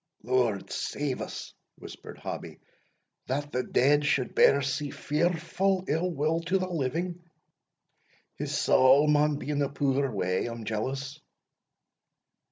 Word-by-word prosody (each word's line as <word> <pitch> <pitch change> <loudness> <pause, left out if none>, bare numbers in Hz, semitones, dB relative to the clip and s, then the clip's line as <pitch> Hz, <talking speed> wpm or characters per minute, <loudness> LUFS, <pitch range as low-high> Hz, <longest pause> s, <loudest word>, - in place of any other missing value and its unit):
"Lord 120 -4 0
safe 140 -3 -3
us!" - - -7 0.2
whispered - - -10
Hobbie, - - -7 0.7
"that 145 +3 -2
the 125 - 0
dead 145 +4 +3
should 140 -3 0
bear 140 0 +5
sie 140 +2 -2
fearfu' 175 +6 0
ill 165 +5 0
will 160 +1 0
to 175 +3 +1
the 185 -1 -2
living! 170 +2 -2 1.1
his - - -3
saul 130 +3 +5
maun 150 0 +3
be 145 +1 -5
in 145 -1 0
a 140 - +1
puir 140 -1 0
way, 90 0 -1
I'm 115 -1 -6
jealous." 135 +6 -3
145 Hz, 130 wpm, -28 LUFS, 130-160 Hz, 1.1 s, bear